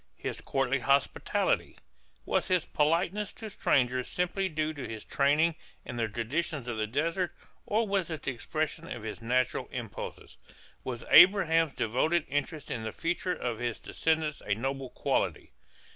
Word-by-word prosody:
His - - -4
courtly 135 0 0
hospitality? 140 +3 +1 0.5
Was - - +1
his 180 -3 +2
politeness 170 +7 +1
to 220 -2 -8
strangers 125 -7 +2
simply 185 +2 -1
due 155 -1 -1
to 140 -4 -6
his 110 -2 -7
training 150 +4 +3 0.3
and 120 - -5
the 115 - +1
traditions 125 +5 -2
of 120 -2 -3
the 110 0 0
desert 165 - -1 0.3
or 220 +2 +2
was 195 -3 0
it 160 -2 -5
the - - -1
expression 155 +6 -3
of 120 - -5
his 110 +1 -6
natural 125 +2 +1
impulses? - - -7 0.5
Was 120 -3 -5
Abraham's 165 -4 +7
devoted 155 +9 +1
interest 145 +2 -2
in 115 - -2
the 110 0 -4
future 175 - -1
of 120 -3 -3
his 120 -2 -2
descendants 160 -2 -1
a 100 - +2
noble 135 +3 -3
quality? - - -1
145 Hz, 155 wpm, -30 LUFS, 125-170 Hz, 0.5 s, Abraham's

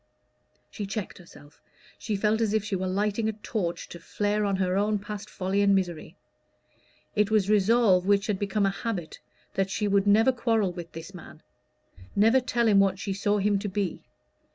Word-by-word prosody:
She 205 - -5
checked 195 -1 -5
herself: 150 -4 -17 0.4
she 215 - -3
felt 210 +3 +1
as 220 -1 +1
if 215 - +1
she 210 - -2
were 185 0 -2
lighting 210 +3 0
a - - -2
torch 205 -4 -4
to 170 - -9
flare 205 +4 -1
on 200 -1 0
her 185 -1 0
own 210 +2 +1
past 205 0 -7
folly 190 +2 -1
and 200 -1 +4
misery. 175 -3 -3 1.0
It 210 -1 +2
was 215 -3 +2
a - - +1
resolve 200 -3 +3
which 200 -1 +3
had 205 -3 -1
become 205 0 0
a 195 - +2
habit, 195 -5 -5 0.3
that 195 0 0
she 210 +2 -1
would 200 0 +2
never 220 +5 +5
quarrel 225 -5 0
with 175 -1 -8
this 165 +4 -9
man 175 - -12 0.7
never 225 +6 +5
tell 240 -2 0
him 205 -2 +5
what 195 -1 +2
she 195 0 -3
saw 205 +2 0
him 205 0 +1
to 205 +1 -4
be. 195 -1 -3
200 Hz, 195 wpm, -27 LUFS, 190-215 Hz, 1.0 s, never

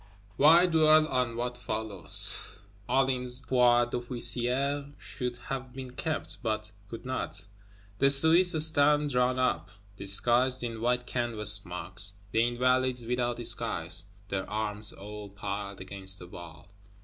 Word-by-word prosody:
Why 165 +5 +6
dwell 155 -2 +4
on 125 -3 -1
what 120 +1 -4
follows? 110 - -1 0.5
Hulin's 125 -1 0
foi 120 -1 +3
d'officier 125 +4 -2
should 125 -2 -5
have 130 +1 -7
been 130 -1 -8
kept, 95 - -4
but 110 -1 -3 0.2
could 115 +2 -9
not. 125 -7 -5 0.5
The 140 - +4
Swiss 160 +6 +5
stand 150 -1 +3
drawn 125 0 +1
up, 95 -9 -1 0.3
disguised 120 +6 0
in 115 -2 -5
white 125 +1 0
canvas 115 -4 0
smocks; 95 0 -3 0.2
the 115 - +2
Invalides 125 0 +1
without 120 0 -2
disguise, 110 -7 -2 0.2
their 95 -1 -4
arms 105 0 -3
all 105 +1 -10
piled 100 0 -6
against 95 0 -6
the 90 - -11
wall. 85 -2 -12
120 Hz, 125 wpm, -28 LUFS, 105-130 Hz, 0.5 s, Why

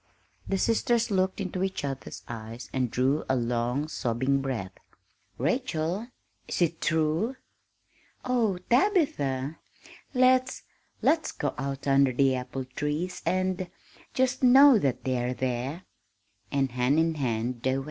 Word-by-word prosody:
The 195 - 0
sisters 230 +2 +1
looked 190 0 +1
into 185 -2 -3
each 190 -5 -2
other's 135 -1 -6
eyes 115 +1 -8
and 130 -2 0
drew 130 +6 +1
a 130 - +3
long, 120 +4 -1
sobbing 130 0 0
breath. 120 -9 -3 0.7
"Rachel, 175 - -1 0.4
is - - -3
it 170 -2 +1
true?" 160 +9 +1 0.9
"Oh, 235 -7 +1
Tabitha! 165 - +1 0.6
Let's 255 +1 +3 0.4
let's 320 -1 +2
go - - -2
out 135 +1 -4
under 135 -1 +4
the 135 +1 +3
apple 130 +1 -4
trees 150 +7 -3
and 185 -1 0 0.5
just 260 0 +1
know 260 -1 +8
that 130 -7 -1
they 130 -2 0
are 125 +1 -2
there!" 130 +7 -3 0.7
And 135 -2 +1
hand 125 +4 +2
in 165 0 +3
hand 120 -4 -2
they 130 +1 +1
went. - - -1
145 Hz, 135 wpm, -27 LUFS, 130-190 Hz, 0.9 s, know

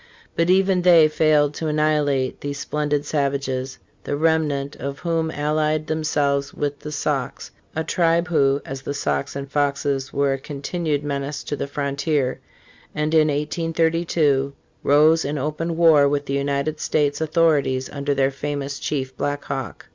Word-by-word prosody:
But 165 +1 +1
even 190 0 +3
they 170 -3 +7
failed 155 -1 +3
to 160 - -4
anni 150 0 +1
hilate 140 -3 0
these 145 0 -4
splendid 145 0 -1
savages, 135 -3 -2 0.3
the - - -2
remnant 150 -3 +1
of 140 +1 -5
whom 165 -1 -1
allied 155 +1 0
themselves 145 -3 0
with 145 -1 -2
the 150 - -7
Sauks, 145 - -3 0.2
a 160 - -1
tribe 170 +1 +1
who, 140 -4 +2
as 135 0 -6
the 140 +2 -4
Sauks 70 - -2
and 140 0 -5
Foxes, 140 -1 -1
were 140 -1 +1
a 135 - -3
continued 145 +1 -3
menace 140 0 -3
to - - -3
the 140 - -4
frontier, 140 -1 -1 0.6
and, 150 +1 -1
in 155 -1 +5
1832, 160 -2 0 0.3
rose 155 +3 +4
in 145 +2 -2
open 155 +4 -2
war 155 -4 +6
with 145 0 -1
the 140 - -3
United 140 +2 -1
States 145 -1 0
au 160 - 0
thorities 145 -5 +2
under 140 0 -1
their 135 0 +2
famous 140 0 -4
chief 130 -3 -3
Black 145 +2 -2
Hawk. 135 -1 -5
145 Hz, 160 wpm, -22 LUFS, 140-155 Hz, 0.6 s, they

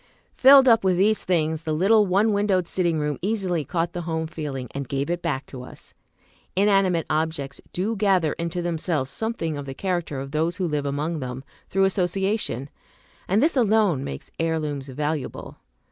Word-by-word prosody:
Filled 270 0 +8
up 225 -3 +5
with 185 -2 +2
these 210 +3 +2
things, 160 -3 0
the 160 -2 -2
little 205 +5 +4
one 205 +4 +3
windowed 200 -4 +1
sitting 170 -3 0
room 150 -1 -2
easily 190 -5 -1
caught 170 +4 -2
the 175 - -3
home 160 -1 -2
feeling, 150 -5 -5
and 140 -2 -5
gave 140 +4 -1
it 175 0 -2
back 150 -6 -2
to 130 - -9
us. 125 - -12 0.6
Inanimate 195 -4 +3
Objects 155 -3 -2
do 205 +6 -1
gather 190 -6 +2
into 170 +1 -3
themselves 160 -5 -1
something 220 -9 -2
of 140 - -7
the 135 - -6
character 175 -6 -2
of 135 +1 -6
those 160 +3 0
who 185 -3 -1
live 150 -2 -1
among 150 +4 -2
them, 130 -1 -5 0.3
through 195 +1 +2
association; 190 - 0 0.6
and 205 +7 +2
this 315 - +2
alone 215 - +3
makes 65 - -7
heirlooms 155 -4 -2
valuable. 145 +1 -4
170 Hz, 175 wpm, -24 LUFS, 150-195 Hz, 0.6 s, Filled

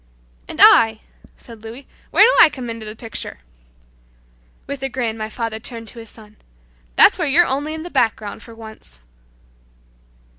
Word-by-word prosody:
"And - - -9
I," 220 -1 +6 0.4
said 230 -3 -14
Louis, 235 +5 -10 0.2
"where - - +5
do - - +5
I - - +6
come 250 -5 -7
into 225 -1 -8
the 215 - -7
picture?" 225 -1 -7 1.3
With 280 0 -7
a 270 - -2
grin 240 -3 -3
my 215 -1 -6
father 225 0 -4
turned 230 -1 -7
to 235 - -11
his 225 -1 -10
son, 215 -1 -16 0.6
"That's - - +5
where 335 - 0
you're 330 +6 +4
only 290 +3 -3
in 315 - -7
the 350 - -9
background 215 -3 -1
for 230 - -13
once." 220 - -13
230 Hz, 170 wpm, -19 LUFS, 220-270 Hz, 1.3 s, I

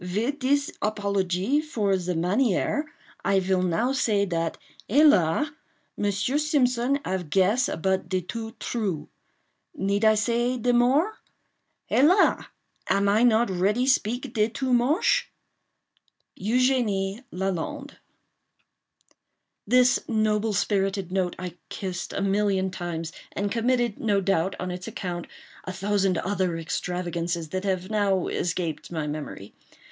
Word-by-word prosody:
"Vid 220 +11 -2
dis 285 +2 +1
apologie 200 +4 0
for 215 -10 0
the 180 -1 -2
manière, 205 - +1 0.4
I 195 -1 +3
vill 185 0 +1
now 185 +8 +1
say 215 -7 +1
dat, 165 -3 -2 0.3
hélas!—Monsieur 245 - +1
Simpson 275 -3 +1
ave 185 -1 -2
guess 195 +10 +2
but 190 -2 0
de 185 0 0
too 225 +5 -6
true. 200 -10 -3 0.7
Need 200 +2 0
I 220 0 +6
say 240 +4 +1
de 245 +1 +1
more? 270 - +2 0.7
Hélas! 350 +9 +4 0.4
am 200 0 +2
I 205 +3 +3
not 235 -2 +4
ready 200 +7 +1
speak 250 0 0
de 215 -1 +2
too 255 +3 -2
moshe? 305 - +3 1.1
"EUGENIE 220 -3 +1
LALAND." 185 -2 -4 1.7
This 250 +2 +5
noble 215 -1 +1
spirited 195 -2 0
note 185 -2 0
I 180 -1 -7
kissed 185 -2 -5
a 195 - -2
million 195 -1 +1
times, 170 -3 -4 0.2
and 200 0 -2
committed, 240 -1 +1
no 205 -3 +2
doubt, 195 -1 0
on 180 0 -3
its 180 +1 -6
account, 175 -2 -5 0.4
a 185 - -4
thousand 195 -1 0
other 185 -4 -1
extravagances 170 0 -3
that 185 +4 -3
have 185 0 -1
now 200 -4 +1
escaped 170 -2 -3
my 160 -3 -2
memory. 145 -9 -6
200 Hz, 120 wpm, -25 LUFS, 185-240 Hz, 1.7 s, I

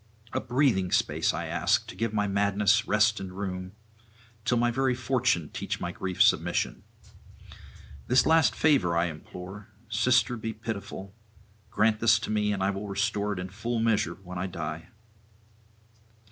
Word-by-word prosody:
A - - +1
breathing 120 -8 +1
space - - +1
I - - -4
ask, - - +1
to - - -9
give 115 -1 -1
my 105 -1 0
madness 100 +3 +2
rest 105 +1 +3
and 95 -1 -6
room, 90 -1 -5 0.7
till 120 +1 +2
my 120 0 +2
very 130 +1 +1
[434 125 - +1
469]fortune - - -15
teach - - -4
my - - -3
grief 90 -1 +1
submission. - - +1 1.3
This 125 +1 +4
last 160 -1 +4
favour 135 - +3
I 85 - +3
implore: 90 +5 -8 0.2
sister, 120 +2 +2
be 110 0 -4
pitiful; 100 -3 -6 0.6
grant 105 +1 +2
this 115 -2 +5
to 110 - -4
me, 105 -1 +1
and 95 -2 -1
I 95 - +2
will 100 +1 -5
restore 105 +1 -1
it - - -7
in 90 +1 -5
full 115 +5 -3
measure 110 -7 +1
when 90 -2 -8
I 95 - -2
die.' 80 -3 -5
105 Hz, 160 wpm, -28 LUFS, 95-115 Hz, 1.3 s, this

